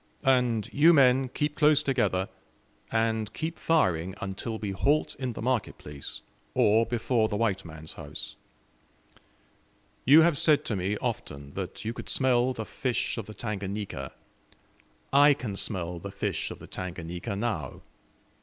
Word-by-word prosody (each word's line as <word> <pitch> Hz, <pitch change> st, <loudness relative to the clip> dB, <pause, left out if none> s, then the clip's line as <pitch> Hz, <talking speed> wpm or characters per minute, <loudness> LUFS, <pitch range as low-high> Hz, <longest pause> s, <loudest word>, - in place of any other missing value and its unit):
And 125 Hz, -5 st, +3 dB
you 160 Hz, +4 st, +6 dB
men 130 Hz, -2 st, +5 dB
keep 150 Hz, +3 st, -2 dB
close 150 Hz, 0 st, +4 dB
together, 120 Hz, -9 st, +1 dB, 0.7 s
and 110 Hz, -1 st, 0 dB
keep 160 Hz, +1 st, -4 dB
firing 95 Hz, -, +1 dB
until 100 Hz, +4 st, -4 dB
we 105 Hz, -2 st, -3 dB
halt 145 Hz, +10 st, +1 dB
in 130 Hz, -3 st, -2 dB
the -, -, -6 dB
market 125 Hz, -3 st, 0 dB
place, 75 Hz, -2 st, -7 dB, 0.3 s
or 110 Hz, +2 st, +4 dB
before 115 Hz, -1 st, +1 dB
the 105 Hz, -, -1 dB
white 100 Hz, -4 st, 0 dB
man's 80 Hz, -2 st, -10 dB
house. -, -, -8 dB, 1.7 s
You 150 Hz, +5 st, +8 dB
have 160 Hz, -3 st, +4 dB
said 150 Hz, -2 st, +4 dB
to 110 Hz, -, -1 dB
me 95 Hz, +3 st, -1 dB
often 70 Hz, -5 st, -5 dB
that 95 Hz, +2 st, -6 dB
you 115 Hz, -, -2 dB
could -, -, -8 dB
smell 130 Hz, -1 st, +3 dB
the 110 Hz, -3 st, -5 dB
fish 125 Hz, +1 st, -1 dB
of 110 Hz, -, -6 dB
the 110 Hz, -, -9 dB
Tanganika 100 Hz, -, -4 dB, 1.0 s
I 145 Hz, +1 st, +7 dB
can 120 Hz, -7 st, -5 dB
smell 90 Hz, -4 st, -2 dB
the 100 Hz, -, -7 dB
fish -, -, -2 dB
of -, -, -7 dB
the -, -, -11 dB
Tanganika 90 Hz, +1 st, -5 dB
now. 110 Hz, +2 st, -3 dB
110 Hz, 150 wpm, -28 LUFS, 95-130 Hz, 1.7 s, You